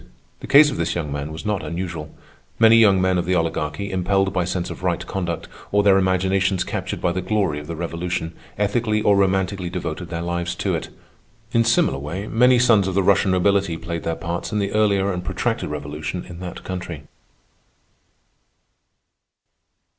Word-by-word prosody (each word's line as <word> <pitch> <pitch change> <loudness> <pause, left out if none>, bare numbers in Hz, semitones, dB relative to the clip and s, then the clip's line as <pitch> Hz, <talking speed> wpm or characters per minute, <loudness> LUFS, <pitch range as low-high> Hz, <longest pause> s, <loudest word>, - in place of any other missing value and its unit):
The - - -9
case 145 +1 +7
of - - -5
this - - -1
young 80 -4 -3
man 70 +1 -4
was 80 +6 -8
not 105 -3 -1
unusual. 85 -3 -5 0.5
Many 115 0 +6
young 100 -4 +5
men 95 -1 +2
of 85 - -3
the 90 - +2
Oligarchy, 80 +3 -2
impelled 95 +1 +1
by 90 - 0
sense 90 -1 -3
of - - -8
right 90 -2 -1
conduct, 85 -3 -4 0.2
or 105 0 +3
their 100 -1 +5
imaginations 95 0 +1
captured - - -4
by 90 - +1
the 95 +1 -2
glory 95 -6 0
of 75 - -10
the 85 - -5
Revolution, 85 0 -3 0.2
ethically 105 +1 0
or 100 - +4
romantically 95 -1 +1
devoted 85 -1 -5
their 85 -1 -4
lives 85 0 -2
to - - -1
it. - - -3 0.6
In 115 - +3
similar 115 - +2
way, 85 +8 -5
many 125 +3 +4
sons 115 -5 +4
of 95 - -2
the 100 - +3
Russian 100 +1 +3
nobility 95 -1 +2
played 85 0 -5
their 80 - -2
parts 85 +1 -4
in 105 - -1
the 100 -1 -1
earlier 100 -2 +2
and 90 0 -4
protracted - - -2
revolution 75 +4 -5
in 85 -1 -10
that 90 -1 -7
country. 90 -5 -6
95 Hz, 180 wpm, -22 LUFS, 85-100 Hz, 0.6 s, case